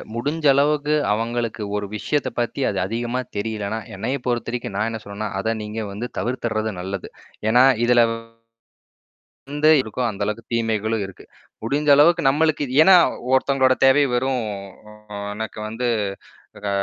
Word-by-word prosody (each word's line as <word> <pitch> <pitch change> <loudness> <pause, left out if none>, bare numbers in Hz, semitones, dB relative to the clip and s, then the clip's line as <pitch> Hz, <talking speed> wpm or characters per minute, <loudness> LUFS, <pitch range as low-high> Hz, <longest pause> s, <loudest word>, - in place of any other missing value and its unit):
முடிஞ்ச 150 +6 -2
அளவுக்கு 145 +1 +2 0.2
அவங்களுக்கு 115 0 -2
ஒரு 105 0 -2
விஷயத்த 145 +6 -1
பத்தி 120 +3 -2
அது 100 - -3
அதிகமா 120 +4 -2 0.2
தெரியலன்னா, 110 0 -3 0.2
என்னைய 125 +8 -2
பொறுத்தவரைக்கும் 120 -3 -2
நான் 110 +2 0
என்ன 110 -1 -6
சொல்றேன்னா, 100 +1 -5
அத 115 +1 -1
நீங்க 105 +1 -5
வந்து 110 +5 -5
தவிர்த்துடுறது 110 -3 -2
நல்லது. 95 +1 -5 0.4
ஏனா 125 +3 +6 0.2
இதில 120 -1 +5 1.5
இந்த 150 +1 +2
இருக்கோ 120 +2 -6
அந்த 100 0 -9
அளவுக்கு 105 +2 -3
தீமைகளும் 110 -2 0
இருக்கு. 95 - -12 0.4
முடிஞ்ச 145 +5 0
அளவுக்கு 170 +4 +5
நம்மளுக்கு 155 +1 +1
இ 150 - +5
ஏன்னா, 190 +2 +8 0.4
ஒருத்தவங்களோட 130 -1 +3
தேவை 135 +2 +5
வெறும் 130 -1 0 0.9
எனக்கு 110 0 -6
வந்து, 120 +3 -3 0.8
ஆ - - 0
120 Hz, 135 wpm, -22 LUFS, 110-135 Hz, 1.5 s, ஏன்னா